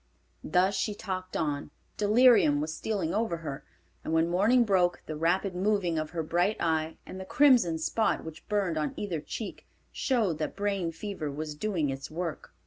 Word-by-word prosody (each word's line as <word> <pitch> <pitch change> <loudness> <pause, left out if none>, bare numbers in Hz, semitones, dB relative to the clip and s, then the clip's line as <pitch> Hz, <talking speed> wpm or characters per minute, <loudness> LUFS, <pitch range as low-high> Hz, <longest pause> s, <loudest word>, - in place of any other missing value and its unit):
Thus 185 +4 +2
she 205 +2 -1
talked 185 -2 -4
on. 145 -3 -2 0.3
Delirium 215 - +5
was 155 +2 -3
stealing 190 -6 -2
over 220 -5 0
her, 145 -4 -6 0.4
and - - -4
when 160 +1 +3
morning 220 +8 +4
broke, 185 -5 +2
the 155 - -5
rapid 180 +5 +1
moving 185 -4 +1
of 155 0 -3
her 165 -1 -3
bright 175 +6 +1
eye, 160 -1 0
and 190 - -8
the - - -5
crimson 240 - +4
spot 220 +7 0
which 160 -1 -10
burned 195 -6 0
on 150 -2 -2
either 180 -7 -3
cheek, 215 +7 -7 0.2
showed 220 - 0
that 155 - -3
brain 200 -4 -1
fever 165 -2 -5
was 150 +2 -5
doing 160 -4 -1
its 135 0 -6
work. 165 -1 -5
175 Hz, 175 wpm, -29 LUFS, 160-205 Hz, 0.4 s, Delirium